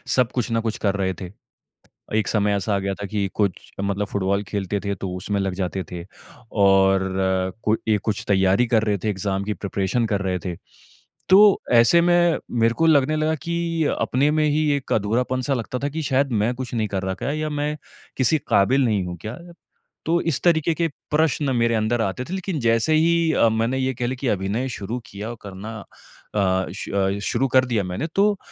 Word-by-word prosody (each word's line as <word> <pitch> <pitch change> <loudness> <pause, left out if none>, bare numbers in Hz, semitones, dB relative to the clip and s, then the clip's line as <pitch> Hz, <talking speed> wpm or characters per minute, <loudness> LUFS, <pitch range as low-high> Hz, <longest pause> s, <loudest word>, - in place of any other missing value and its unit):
सब 125 -2 +2
कुछ 125 -2 -2
ना 115 - +2
कुछ 110 - -1
कर 100 -2 0
रहे 95 -1 -1
थे। 90 0 -6 0.9
एक 110 - 0
समय 105 -2 +1
ऐसा 100 +1 -1
आ - - +1
गया 95 0 -2
था 100 - -3
कि 100 0 -1
कुछ 100 -4 -2
मतलब 100 +1 -1
फुटबॉल 100 0 -1
खेलते 100 0 -2
थे, 100 0 -3
तो 95 0 -5
उसमें 100 +2 -2
लग 95 -1 -1
जाते 95 0 -3
थे 85 -1 -6 0.5
और 95 -1 +3 0.5
कोई 110 +1 +2 0.2
ऐ - - +2
कुछ 110 0 -2
तैयारी 95 +3 +3
कर 110 - +3
रहे 105 -2 +1
थे, 105 +3 -3
एग्ज़ाम 95 0 -2
की 105 +1 -2
प्रिपरेशन 100 +4 -1
कर 100 - 0
रहे 95 -1 -1
थे। 90 -2 -3 0.7
तो 200 +1 +7 0.2
ऐसे 145 +9 +5
में 175 -1 +3
मेरे 115 -1 +2
को 165 - +1
लगने 155 0 +4
लगा 155 +1 +1
कि 170 -1 -1 0.2
अपने 140 +4 +2
में 155 0 +2
ही 150 +1 +1
एक 130 - -4
अधूरापन-सा 125 +5 0
लगता 125 +1 -4
था 140 - -2
कि, 160 +3 -4
"शायद 135 -2 +1
मैं 120 - +1
कुछ 125 -1 -6
नहीं 110 -3 0
कर 95 -1 -2
रहा 95 0 -1
क्या? 140 - -3
या 155 0 -2
मैं 150 +1 -2 0.4
किसी 145 +4 +3
काबिल 130 +7 +3
नहीं 105 -5 +1
हूँ 90 0 -6
क्या?" 110 +7 -6 0.7
तो 170 +2 +2
इस 165 -5 0
तरीके 165 -1 +3
के 165 +1 +1 0.2
प्रश्न 150 -3 +1
मेरे 115 0 +2
अंदर 110 +2 0
आते 100 +4 -2
थे, 180 - -7
लेकिन 190 -4 -3
जैसे 115 +6 +2
ही 165 +1 +3
अ, 115 - +4
मैंने 115 +4 0
ये 130 0 0
कह 120 +1 -2
लें 130 +1 -3
कि 130 0 -3
अभिनय 105 +6 -1
शुरू 115 +1 -4
किया 105 +4 -6
करना 100 +3 -8 0.6
अ, 95 -2 +1
श - - -6
अ, 100 0 0
शुरू 120 +5 +1
कर 130 0 +4
दिया 115 -5 0
मैंने, 90 - -3
तो 205 0 +3
115 Hz, 205 wpm, -22 LUFS, 100-145 Hz, 0.9 s, तो